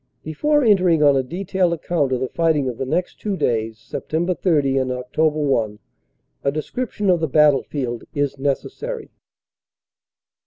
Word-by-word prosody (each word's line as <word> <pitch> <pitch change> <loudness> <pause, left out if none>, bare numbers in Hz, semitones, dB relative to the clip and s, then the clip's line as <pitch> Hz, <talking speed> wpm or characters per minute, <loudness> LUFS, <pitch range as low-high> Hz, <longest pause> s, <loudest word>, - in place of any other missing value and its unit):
Before 295 - +1
entering 180 -8 +4
on 145 -1 +6
a 135 - +3
detailed 180 +5 -1
account 160 -4 -1
of 130 -1 0
the 130 - 0
fighting 160 -5 +1
of 125 -3 -4
the 135 - -2
next 175 +6 -2
two 205 -3 -2
days 110 -5 -1
Sept. 170 - -2
30 145 -7 +2
and 130 -1 -1
Oct. 125 +5 0
1 130 -9 0 0.6
a 140 - +2
description 205 - -2
of 175 - +2
the 160 - 0
battlefield 140 -4 +1
is 145 -1 -2
necessary. 430 - -3
150 Hz, 150 wpm, -21 LUFS, 130-175 Hz, 0.6 s, on